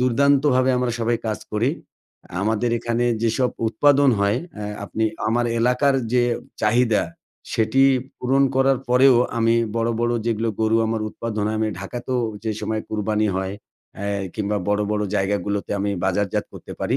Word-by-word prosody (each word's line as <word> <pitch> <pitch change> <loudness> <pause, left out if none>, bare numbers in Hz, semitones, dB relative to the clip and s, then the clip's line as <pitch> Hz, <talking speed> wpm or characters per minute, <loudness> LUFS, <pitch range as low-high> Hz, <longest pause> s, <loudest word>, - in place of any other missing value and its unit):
দুর্দান্তভাবে 130 +1 +3
আমরা 125 -1 0
সবাই 115 +1 +1
কাজ 110 -1 -1
করি। 115 +6 +1 0.7
আমাদের 110 +3 0
এখানে 120 +1 -1 0.2
যেসব 125 +3 +1 0.2
উৎপাদন 140 +4 +4
হয় 100 +3 +2 0.2
অ্যা 105 -1 -6 0.2
আপনি 110 +2 -2 0.2
আমার 120 +2 +1
এলাকার 125 +4 +2 0.2
যে 125 -1 +4 0.4
চাহিদা, 115 0 +3 0.5
সেটি 115 +3 +2 0.4
পূরণ 135 +2 +2
করার 135 -1 +3
পরেও 125 +1 +6 0.2
আমি 115 0 +3 0.2
বড়ো, 115 0 +1
বড়ো 120 0 +1
যেগুলো 115 0 0
গরু 110 0 +3
আমার 110 0 -1
উৎপাদন 110 -2 -4
হয় 110 - -1
আমি 110 - +1
ঢাকাতেও 120 +5 -3 0.2
যে 110 - 0
সময় 110 0 -2
কুরবানি 105 0 0
হয় 95 0 -2 0.4
অ্যা 100 - -5 0.3
কিংবা 105 -1 -1
বড়ো, 105 0 +2
বড়ো 105 0 0
জায়গাগুলোতে 100 +1 -1
আমি 100 0 0
বাজারজাত 95 +1 0
করতে - - -10
পারি। - - 0
115 Hz, 150 wpm, -22 LUFS, 105-125 Hz, 0.7 s, পরেও